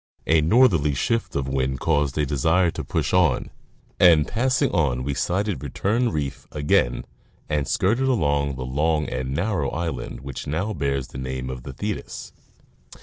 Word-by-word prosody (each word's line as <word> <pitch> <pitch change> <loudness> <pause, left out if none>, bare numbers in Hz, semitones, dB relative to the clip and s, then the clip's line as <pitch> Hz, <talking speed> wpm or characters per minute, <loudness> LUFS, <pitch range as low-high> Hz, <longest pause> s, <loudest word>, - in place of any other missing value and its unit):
A 80 0 +4
northerly 85 - +4
shift 115 - -1
of 70 -2 -1
wind 65 -1 -1
caused 75 -3 +1
a 75 - +2
desire 80 +6 +2
to - - -5
push - - -2
on, 90 -8 +2 0.5
and 80 -4 +6
passing 130 +4 +1
on 65 -6 +1
we 70 +2 -2
sighted 95 +7 -1
Return 105 - 0
reef 75 -8 -4
again 75 -4 +1 0.4
and 75 -3 -1
skirted 120 +8 +1
along 70 - +1
the 65 -1 -5
long 75 +4 0
and 65 +1 -3
narrow 85 -5 0
island 80 -5 -4
which 70 -1 -7
now 90 +9 -1
bears 70 -5 -2
the 65 - -8
name 65 0 -4
of 65 -1 -7
the 65 - -8
Thetis. 105 +8 -5
75 Hz, 160 wpm, -23 LUFS, 70-90 Hz, 0.5 s, and